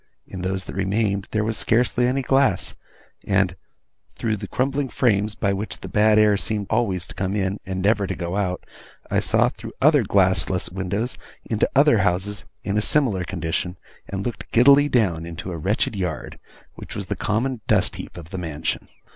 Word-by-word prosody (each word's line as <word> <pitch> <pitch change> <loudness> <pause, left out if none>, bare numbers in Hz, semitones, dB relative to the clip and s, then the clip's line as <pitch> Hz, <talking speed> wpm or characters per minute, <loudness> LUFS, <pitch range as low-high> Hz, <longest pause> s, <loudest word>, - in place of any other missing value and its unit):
In 95 - -8
those 95 0 -2
that - - -7
remained, 100 +1 0
there 110 0 0
was 110 0 -1
scarcely 120 +1 +2
any 135 +2 0
glass; 135 -8 +2 0.5
and, 95 -2 +1 0.6
through 110 -2 -1
the 100 -1 -7
crumbling 135 +3 -1
frames 105 -4 +1
by 100 -3 0
which 100 +3 -4
the - - -6
bad 105 0 +4
air 105 -1 +5
seemed 105 0 -1
always 100 -6 +1
to - - -9
come 95 0 -2
in, 100 0 -1
and 95 -1 -3
never 105 -1 +2
to - - -3
go 85 +1 -4
out, 95 -3 -2 0.5
I - - +3
saw, 115 +2 +3
through 115 -2 -10
other 145 0 +5
glassless 95 -3 +1
windows, 100 +6 -3 0.3
into 110 -2 +1
other 140 -4 +5
houses 100 +2 0 0.2
in 100 +1 0
a - - +1
similar 110 -8 +3
condition, 85 0 -3 0.3
and 100 0 -4
looked 120 - -5
giddily 140 +4 +6
down 95 - +1
into 85 +2 -6
a 85 - -4
wretched 100 +6 0
yard, 90 -5 -4 0.3
which - - -10
was - - -4
the - - -3
common 115 +3 -1
dust - - +2
heap - - -9
of 80 -1 -10
the 95 - -4
mansion. 80 -2 -3
100 Hz, 185 wpm, -23 LUFS, 95-115 Hz, 0.6 s, giddily